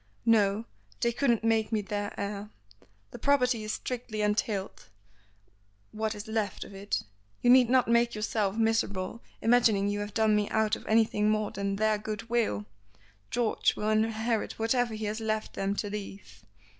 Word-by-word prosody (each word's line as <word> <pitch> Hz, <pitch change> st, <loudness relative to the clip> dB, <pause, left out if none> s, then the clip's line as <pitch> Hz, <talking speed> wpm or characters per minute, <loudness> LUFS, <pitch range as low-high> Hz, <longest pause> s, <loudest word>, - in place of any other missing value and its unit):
"No. 215 Hz, -1 st, +3 dB, 0.4 s
They 235 Hz, -, +2 dB
couldn't 235 Hz, -2 st, +1 dB
make 225 Hz, -1 st, +2 dB
me 215 Hz, -2 st, +1 dB
their 205 Hz, 0 st, -4 dB
heir. 200 Hz, +1 st, -4 dB, 0.6 s
The -, -, -9 dB
property 250 Hz, -5 st, +2 dB
is 215 Hz, -, -3 dB
strictly 235 Hz, -4 st, -4 dB
entailed 210 Hz, -, -2 dB, 1.0 s
(what 220 Hz, 0 st, -2 dB
is 210 Hz, +2 st, -8 dB
left 220 Hz, -3 st, -2 dB
of -, -, -12 dB
it); 200 Hz, +1 st, -2 dB, 0.4 s
you 245 Hz, -, +6 dB
need 250 Hz, -2 st, +6 dB
not 255 Hz, 0 st, +4 dB
make 235 Hz, 0 st, +3 dB
yourself 215 Hz, -1 st, -1 dB
miserable 225 Hz, -2 st, 0 dB, 0.2 s
imagining 225 Hz, -4 st, +4 dB
you 205 Hz, 0 st, -2 dB
have 205 Hz, 0 st, -5 dB
done 220 Hz, -1 st, +3 dB
me 210 Hz, -1 st, +1 dB
out 220 Hz, -1 st, +2 dB
of -, -, -12 dB
anything 215 Hz, -1 st, +3 dB
more 215 Hz, -1 st, 0 dB
than 200 Hz, 0 st, -2 dB
their 215 Hz, +1 st, +1 dB
good 215 Hz, +2 st, -6 dB
will. 215 Hz, -, 0 dB, 0.6 s
George 235 Hz, -2 st, +1 dB
will 210 Hz, -, -1 dB
inherit 220 Hz, +1 st, 0 dB
whatever 230 Hz, 0 st, +1 dB
he 215 Hz, 0 st, -4 dB
has 210 Hz, +2 st, -2 dB
left 220 Hz, -1 st, -2 dB
them 195 Hz, +1 st, -1 dB
to 205 Hz, -, -2 dB
leave." 195 Hz, -, -8 dB
215 Hz, 165 wpm, -29 LUFS, 205-230 Hz, 1.0 s, you